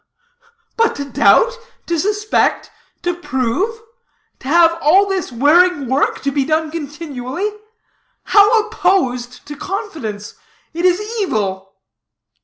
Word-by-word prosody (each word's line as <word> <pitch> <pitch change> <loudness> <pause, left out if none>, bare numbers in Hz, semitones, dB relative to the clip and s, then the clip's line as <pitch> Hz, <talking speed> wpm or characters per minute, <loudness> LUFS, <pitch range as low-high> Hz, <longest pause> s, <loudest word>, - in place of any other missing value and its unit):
"But 455 0 +2
to 285 - -5
doubt, 475 - +3 0.3
to 340 -1 -1
suspect, 420 +4 0 0.3
to 355 0 0
prove 340 - -2 0.6
to - - -11
have 335 +2 +4
all 370 +7 +5
this 385 -7 -3
wearing 295 +5 +3
work 265 +4 0
to 280 - 0
be 275 0 0
doing 310 +2 -1
continually 300 +2 -5 0.7
how 425 +2 +5
opposed 260 - -1
to 295 - -8
confidence. 285 - -6 0.4
It 340 +2 -2
is 360 0 +3 0.2
evil!" 195 - -3
320 Hz, 115 wpm, -17 LUFS, 265-385 Hz, 0.7 s, all